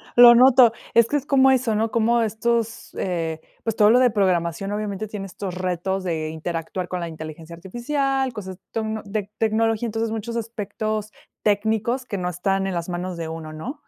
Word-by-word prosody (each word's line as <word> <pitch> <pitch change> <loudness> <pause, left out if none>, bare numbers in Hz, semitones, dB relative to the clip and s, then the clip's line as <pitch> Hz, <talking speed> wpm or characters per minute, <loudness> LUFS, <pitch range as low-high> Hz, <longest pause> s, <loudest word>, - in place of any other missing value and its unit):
lo 240 0 +10
noto. 250 -1 +7 0.2
Es 230 0 +5
que 290 - +1
es 280 - -5
como 265 -2 +5
eso, 245 -4 +2
¿no? 220 +1 0
Como 230 +1 +2
estos, 225 +1 -1
eh, 165 -3 -2 0.2
pues 225 -2 -1
todo 210 -1 +5
lo 245 +2 +6
de 250 -1 +5
programación 185 -2 0
obviamente 210 0 -3
tiene 200 -2 -6
estos 185 0 -6
retos 185 +1 -2
de 160 -3 -2
interactuar, 165 +2 -4
con 180 - -3
la 170 - -3
inteligencia 160 +1 -8
artificial, 265 - -1
cosas 190 -4 -7
tocno 220 -1 -2
de 205 0 -3
tecnología, 225 +1 +1
entonces, 225 0 -2
muchos 225 +1 -4
aspectos 215 -1 -3 0.3
técnicos, 220 +4 +1
que 200 -5 -4
no 180 -1 -2
están 195 +2 -1
en 190 - -2
las 170 +1 -3
manos 175 0 -4
de 165 -1 -4
uno, 160 -1 -7
¿no? 240 - -7
210 Hz, 185 wpm, -23 LUFS, 180-230 Hz, 0.3 s, lo